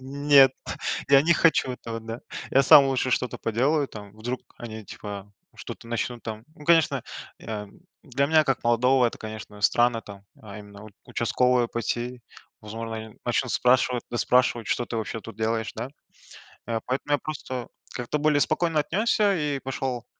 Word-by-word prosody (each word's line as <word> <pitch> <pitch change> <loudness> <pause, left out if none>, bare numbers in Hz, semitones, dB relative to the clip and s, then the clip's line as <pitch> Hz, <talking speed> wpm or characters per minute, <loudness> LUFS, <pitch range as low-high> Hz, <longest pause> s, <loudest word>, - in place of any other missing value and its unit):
"Нет, 140 0 +5 0.6
я 140 0 +7
не 170 +3 +4
хочу 155 -5 +3
этого", 115 -2 -6
да, 115 +1 -7 0.3
я 135 - +5
сам 140 +1 +8
лучше 130 -1 0
что-то 125 -1 0
поделаю 135 +6 +1
там, 105 -2 -10
вдруг 120 +4 -4 0.2
они, 110 -2 -8
типа, 100 0 -8 0.2
что-то 115 - -9
начнут 120 0 -3
там. 110 0 -6
Ну, 150 - -13
конечно, 165 -1 +3 0.4
я 105 -2 -6 0.4
для 140 -1 0
меня 155 +1 +4
как 135 -2 0
молодого 125 +2 +4
это, - - -4
конечно, 110 -1 -8
странно 120 +2 +3
там. 100 -1 -11 0.2
А 105 -1 -10
именно 100 -1 -12
в 110 - -11 0.2
участковые 125 +1 +1
пойти 120 +1 -3 0.4
возможно, 115 +1 -6
они 110 -1 -9
начнут 120 0 0
спрашивать, 125 -1 +2
выспрашивать: 120 -1 +2
"Что 120 - 0
ты 115 - -4
вообще 110 0 -3
тут 100 - -11
делаешь, 110 0 -1
да?" 115 +3 -4 0.8
А 115 -1 -1
поэтому 135 +3 -1
я 145 - +4
просто 130 -5 -5 0.3
как-то 125 +4 -2
более 150 -1 +3
спокойно 165 0 +1
отнесся 205 +5 +2
и 150 -4 -1
пошел, 130 -2 -4
125 Hz, 165 wpm, -25 LUFS, 115-140 Hz, 0.8 s, сам